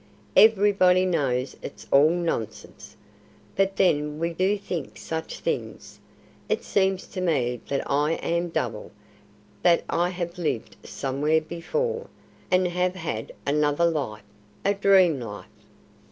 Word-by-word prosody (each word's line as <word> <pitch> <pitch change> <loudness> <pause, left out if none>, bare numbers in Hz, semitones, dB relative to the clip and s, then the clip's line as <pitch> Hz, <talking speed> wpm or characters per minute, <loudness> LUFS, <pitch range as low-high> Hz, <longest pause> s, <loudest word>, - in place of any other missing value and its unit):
"Everybody 195 -4 +5
knows 135 -7 0
it's - - -9
all 140 +3 +6
nonsense. 170 - -4 0.6
But 195 0 +1
then 150 -5 +2
we 170 +1 -2
do 190 +4 +1
think 175 -7 -5
such 160 0 -5
things. - - -4 0.5
It - - 0
seems 190 -1 +1
to 185 - -5
me 125 -9 0
that 140 - -1
I 150 +3 +1
am 170 +1 -1
double, 115 -9 -3 0.7
that 170 -1 +4
I 175 +1 +1
have 175 -1 -5
lived 150 -9 -2
somewhere 145 +4 0
before, 465 - -3 0.4
and 185 0 +3
have 180 +1 0
had 160 -11 -4
another 150 +3 +2
life 135 -11 -2 0.4
a 200 - +4
dream 190 -6 +4
life." 105 -6 -7
170 Hz, 125 wpm, -25 LUFS, 145-185 Hz, 0.7 s, all